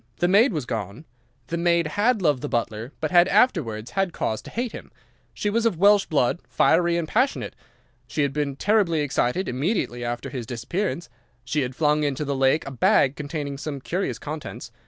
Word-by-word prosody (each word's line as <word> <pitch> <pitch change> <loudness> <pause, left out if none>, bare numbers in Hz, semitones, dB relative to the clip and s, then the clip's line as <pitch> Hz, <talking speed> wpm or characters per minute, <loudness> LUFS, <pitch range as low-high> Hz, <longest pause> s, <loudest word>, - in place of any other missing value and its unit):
The 175 - +2
maid 210 +8 +5
was 150 -8 -3
gone. 110 - -5 0.4
The 170 - -2
maid 170 -1 +2
had 205 +6 +1
loved 145 -6 +2
the - - -4
butler, 115 +1 -2
but 155 - -1
had 175 0 +6
afterwards 155 - +1
had 195 -3 0
cause 110 - -2
to - - -11
hate 240 0 -3
him. - - -10 0.4
She 115 - -4
was 225 +3 +1
of 225 -7 +1
Welsh 200 +2 +5
blood, 145 +1 +1
fiery 170 +1 +3
and 165 -2 -2
passionate. 255 - 0 0.5
She 150 - -1
had 140 -1 -1
been 145 -2 -2
terribly 190 -3 +2
excited 145 +4 0
immediately 130 - -1
after 120 0 -4
his 125 -5 -5
disappearance. 170 - -3 0.4
She 145 +4 0
had 125 -1 -3
flung 150 0 +2
into 145 0 -1
the 140 0 -1
lake 135 +3 +2
a 135 - -6
bag 135 +1 +3
containing 145 -2 -5
some 145 -2 -5
curious 180 +8 -2
contents. 155 0 -7
150 Hz, 190 wpm, -24 LUFS, 130-180 Hz, 0.5 s, had